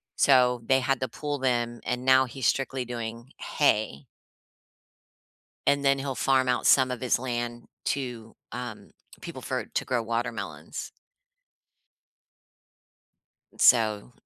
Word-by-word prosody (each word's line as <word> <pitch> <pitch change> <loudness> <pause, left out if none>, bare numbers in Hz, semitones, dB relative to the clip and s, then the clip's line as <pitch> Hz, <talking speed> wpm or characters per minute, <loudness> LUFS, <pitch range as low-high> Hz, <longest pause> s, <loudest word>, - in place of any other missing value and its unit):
so, 125 -3 +4
they 130 0 +4
had 135 0 0
to 130 - 0
pull 145 +1 -4
them, 120 -2 0
and 125 +1 -3
now 130 0 +6
he's 130 -1 -6
strictly 135 -2 0
doing 115 +1 -6
hay 105 - 0 1.6
and 140 0 +3
then 140 0 +3
he'll 135 -1 -3
farm 130 -1 +2
out 125 -1 0
some 130 -1 +5
of 125 - -5
his 125 -2 +1
land 120 -1 -4 0.2
to, 125 -5 -4 0.2
um, 120 -3 -7 0.3
people - - -8
for - - -3
to - - -3
grow 125 -2 0
watermelons. 115 -2 -4 2.6
So 110 -2 +4
125 Hz, 120 wpm, -27 LUFS, 120-130 Hz, 2.6 s, now